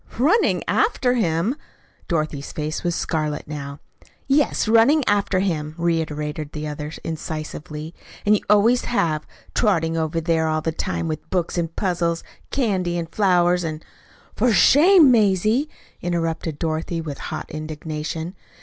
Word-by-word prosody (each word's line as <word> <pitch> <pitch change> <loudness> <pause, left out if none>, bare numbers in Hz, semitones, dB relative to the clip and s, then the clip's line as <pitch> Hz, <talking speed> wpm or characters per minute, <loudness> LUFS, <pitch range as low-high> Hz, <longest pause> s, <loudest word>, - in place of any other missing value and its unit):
"RUNNING 315 - +3
AFTER 265 - +2
HIM!" 205 - +1 0.5
Dorothy's 155 -4 -2
face 155 +1 -3
was 175 -1 0
scarlet 155 -4 -2
now. 140 -1 -6 0.5
"Yes, 275 -4 +2
running 230 +6 +5
after 200 -2 +2
him," 155 -5 -2
reiterated 155 -3 -2
the 150 0 -4
other 150 0 -5
incisively; 155 0 -5 0.3
"and 210 - +5
you - - -1
always 220 +4 +4
have 155 -10 0 0.3
trotting 165 -7 +1
over 160 0 -1
there 165 -1 +1
all 155 0 0
the 160 - -1
time 165 +1 -3
with 155 -1 -5
books 180 -3 -1
and 170 -2 -2
puzzles 170 -3 0
and - - -25
candy 190 -9 0
and 165 -1 -5
flowers. 180 -3 +3
And 155 -1 -5 0.2
" - - -28
"For 240 +2 +3
shame, 305 - +6
Mazie!" 215 - +3 0.3
interrupted 165 -3 -2
Dorothy, 160 +1 -2
with 150 -4 -6
hot - - -6
indignation. 155 +2 -5
165 Hz, 140 wpm, -22 LUFS, 155-205 Hz, 0.5 s, shame